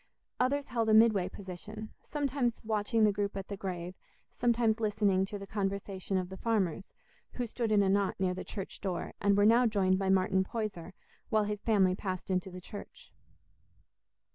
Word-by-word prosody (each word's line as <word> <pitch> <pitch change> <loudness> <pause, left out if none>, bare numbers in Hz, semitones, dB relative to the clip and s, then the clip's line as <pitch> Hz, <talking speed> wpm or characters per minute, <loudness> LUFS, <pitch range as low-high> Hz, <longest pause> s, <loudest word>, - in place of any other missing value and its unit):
Others 280 +3 +1
held 230 -4 -1
a 215 - +6
midway 215 -5 +5
position, 205 +4 -8
sometimes 275 -5 -1
watching 220 +1 +1
the 210 - +5
group 200 0 -2
at 195 - -6
the 200 - -3
grave, 180 -2 -5 0.4
sometimes 235 -2 +2
listening 205 -3 +2
to 205 +1 -6
the 200 - -8
conversation 195 -1 -2
of 180 -1 -2
the 190 - -8
farmers, 200 -6 -1 0.4
who 245 - -2
stood 230 -1 -2
in 205 -1 +5
a - - +2
knot 200 0 +1
near 185 -1 +1
the 185 - -5
church 195 -2 -7
door, 185 -3 -3
and 200 0 +3
were 205 - +5
now 235 +3 +6
joined 190 -3 +2
by 195 -1 0
Martin 190 0 +3
Poyser, 195 -5 -5 0.4
while 215 -1 +3
his 210 0 -3
family 195 -5 +3
passed 185 -1 -4
into 185 0 0
the 180 0 -8
church. 200 +3 -11
205 Hz, 180 wpm, -31 LUFS, 190-220 Hz, 0.4 s, a